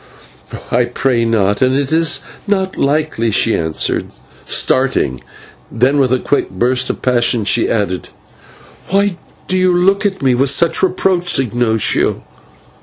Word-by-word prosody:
"I 120 0 +2
pray 120 -1 0
not, 105 -3 0
and 130 0 +2
it 140 0 -1
is 165 0 +2 0.3
not 190 -2 -1
likely," 140 -5 0
she 110 +2 +1
answered, 80 -1 -2 0.4
starting, 65 0 0 0.5
then 130 +5 +1
with 130 -3 +2
a 130 - +3
quick 145 - -1
burst 125 +6 0
of - - -5
passion 120 -3 +1
she 115 +2 +2
added: 100 -4 -2 0.8
"But 190 - -3
why 200 -3 +1 0.3
do 185 - 0
you 185 0 +3
look 195 +3 +2
at 190 -7 -6
me 130 -2 +3
with 130 +3 +2
such 165 +4 +2
reproach, 180 -1 +1
Ignatio? 120 -3 0
130 Hz, 145 wpm, -15 LUFS, 115-170 Hz, 0.8 s, a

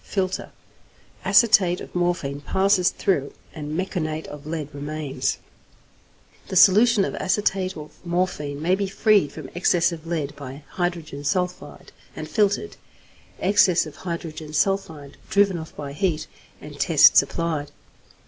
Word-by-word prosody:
Filter. 185 -2 -3 0.7
Acetate 200 -4 +4
of - - -10
morphine 175 -6 -1
passes 190 +3 +2
through, 145 -8 -1 0.2
and 150 0 -5
meconate 160 -4 -3
of 145 0 -10
lead 155 -2 -4
remains. 145 0 -3 1.1
The - - -5
solution 210 +3 +6
of - - -4
acetate 190 -1 0
of 150 0 -12
morphine 170 -5 -2
may 180 +3 +2
be 195 +1 0
freed 195 -5 +3
from 150 -4 -9
excess 175 0 +2
of 165 -1 -8
lead 155 -4 -3
by 140 +1 -9
hydrogen 170 -5 -3
sulphide 180 +4 -3 0.2
and - - -6
filtered, 210 - 0 0.6
excess 185 -3 +3
of 155 - -11
hydrogen 165 -3 -6
sulphide 160 -5 -1
driven 200 -3 +3
off 160 - -10
by 140 -1 -6
heat, 160 0 -1 0.3
and - - -11
tests - - +6
applied. 160 -4 -3
170 Hz, 130 wpm, -23 LUFS, 150-190 Hz, 1.1 s, solution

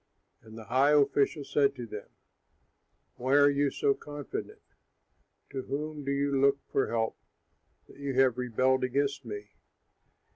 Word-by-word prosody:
And 110 0 -13
the 110 - -8
high 130 +7 +3
official 140 0 +2
said 140 0 +1
to 125 -2 -6
them, 105 -2 -8 1.1
"Why 130 +3 +1
are 145 0 +6
you 140 0 +1
so 140 - +1
confident? 145 0 -7 0.9
To 135 - -3
whom 150 +2 -5
do 140 - -2
you 140 0 0
look 140 0 +4
for 135 - +1
help 115 -1 -1 0.7
that - - -17
you 140 -2 -3
have 130 -2 +3
rebelled 130 +2 +1
against 140 +1 -1
me? 105 -2 -7
135 Hz, 145 wpm, -29 LUFS, 125-140 Hz, 1.1 s, are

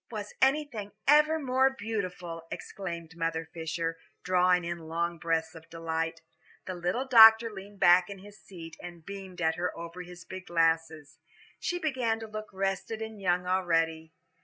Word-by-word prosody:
"Was 210 -2 -6
anything 265 -7 +1
ever 300 +2 +5
more 265 -2 +2
beautiful?" 180 -8 -5
exclaimed 170 -4 -7
Mother 165 -1 -2
Fisher, 165 0 -3 0.2
drawing 180 -1 +3
in 170 -1 -5
long 170 +1 -2
breaths 160 -1 -1
of 165 0 -13
delight. 165 0 -3 0.4
The 185 - -4
little 180 +9 -2
doctor 225 -2 +8
leaned 200 0 -11
back 175 +1 +6
in 200 - -7
his 205 +2 -14
seat, 165 -4 -10
and 175 -2 -10
beamed 195 -2 -8
at 160 0 +1
her 180 +1 -2
over 170 +2 -7
his 175 -1 -11
big 185 -1 -9
glasses. 160 -2 0 0.4
She 355 - -2
began 255 -9 -1
to 225 - -7
look 215 0 -7
rested 195 +3 -2
and 220 -2 -7
young 180 -1 +1
already. 165 -3 0
180 Hz, 160 wpm, -29 LUFS, 165-215 Hz, 0.4 s, doctor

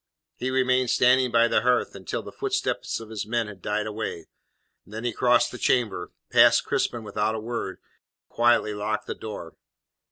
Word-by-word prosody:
He 130 - -3
remained 130 -1 +2
standing 125 +1 +4
by 115 0 +4
the - - +2
hearth 125 +1 +1
until 95 -3 -5
the - - -9
footsteps - - -2
of 110 -1 -11
his 105 -1 -4
men 115 0 0
had 100 -3 -11
died 105 +2 -1
away, 105 -6 -5 0.5
then 110 +3 -8
he 120 -2 -1
crossed 120 -1 +3
the 125 - -8
chamber, 105 -8 0 0.2
passed - - +6
Crispin 120 -2 -1
without 105 +1 -1
a - - -3
word, 110 -4 -4
and - - -42
quietly 120 -2 +3
locked 105 +1 -2
the - - -4
door. 105 -7 -8
110 Hz, 180 wpm, -25 LUFS, 105-120 Hz, 0.5 s, passed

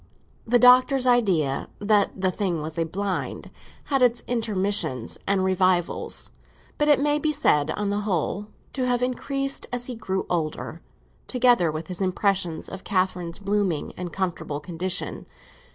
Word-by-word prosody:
The 245 +2 +5
Doctor's 255 +2 +6
idea 190 - +2
that 205 -1 +1
the 185 -1 +2
thing 180 -4 -1
was 160 +1 -5
a 165 - +1
"blind" 190 +3 -3 0.3
had 275 -2 0
its 240 -1 +3
intermissions 205 - -1
and 195 -1 +2
revivals; 185 -2 0 0.5
but 295 - +2
it 295 -2 +5
may 295 +1 +2
be 305 +1 +1
said 150 - +2
on 200 +4 -1
the 205 - 0
whole 200 0 -1 0.3
to 255 -2 -1
have 245 0 +1
increased 275 +2 -2
as 245 0 -2
he 250 - -5
grew 190 -4 -3
older; 160 -3 -3 0.5
together 245 -10 +3
with 155 +1 -5
his 180 +3 -6
impression 185 -3 0
of - - -8
Catherine's 185 -3 -1
blooming 200 -5 -1
and 175 -1 -5
comfortable 175 -6 -3
condition. 180 +3 -3
195 Hz, 150 wpm, -25 LUFS, 175-245 Hz, 0.5 s, Doctor's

